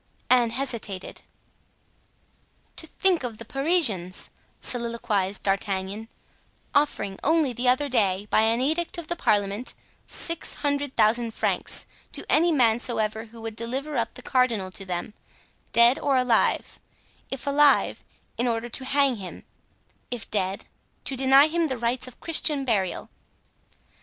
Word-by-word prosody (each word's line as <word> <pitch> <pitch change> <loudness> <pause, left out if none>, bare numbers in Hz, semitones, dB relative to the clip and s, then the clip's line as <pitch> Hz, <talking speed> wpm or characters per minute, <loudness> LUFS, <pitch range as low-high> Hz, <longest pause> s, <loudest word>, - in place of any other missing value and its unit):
Anne 245 -2 +5
hesitated. 230 -6 -3 1.5
"To 320 - -2
think 365 -2 +1
of 235 -3 -4
the 230 - -9
Parisians," 270 - +1 0.3
soliloquized 230 -5 0
D'Artagnan, 195 +2 -1 0.7
"offering 285 -9 0
only 310 -4 +2
the 245 +2 +1
other 260 +3 +2
day, 200 -6 +1
by - - +4
an 225 +2 +2
edict 320 +6 0
of 340 -2 -7
the 345 - 0
parliament, 205 -3 0 0.3
six 335 -1 -2
hundred 285 -2 -2
thousand 225 +1 +2
francs - - 0 0.3
to - - -5
any 335 +3 +4
man 240 -6 +3
soever 220 -2 -2
who 230 0 -13
would 225 -1 -6
deliver 265 +6 -3
up 230 -2 -1
the 250 - -11
cardinal 230 -7 +1
to 195 +1 -6
them, 180 +3 -4 0.6
dead 235 +2 +5
or 275 -2 +1
alive—if 250 +1 -2
alive, 285 0 +3 0.4
in 245 - +2
order 230 0 -1
to 260 +3 -3
hang 275 -2 +2
him; 190 -3 -9 0.7
if 245 -2 -4
dead, 195 -2 -1 0.4
to 270 - -1
deny 270 +2 +6
him 330 +1 0
the 260 -3 -3
rites 240 +2 -1
of 255 - -13
Christian 300 -4 +2
burial!" 200 -7 -1
240 Hz, 135 wpm, -25 LUFS, 215-275 Hz, 1.5 s, deny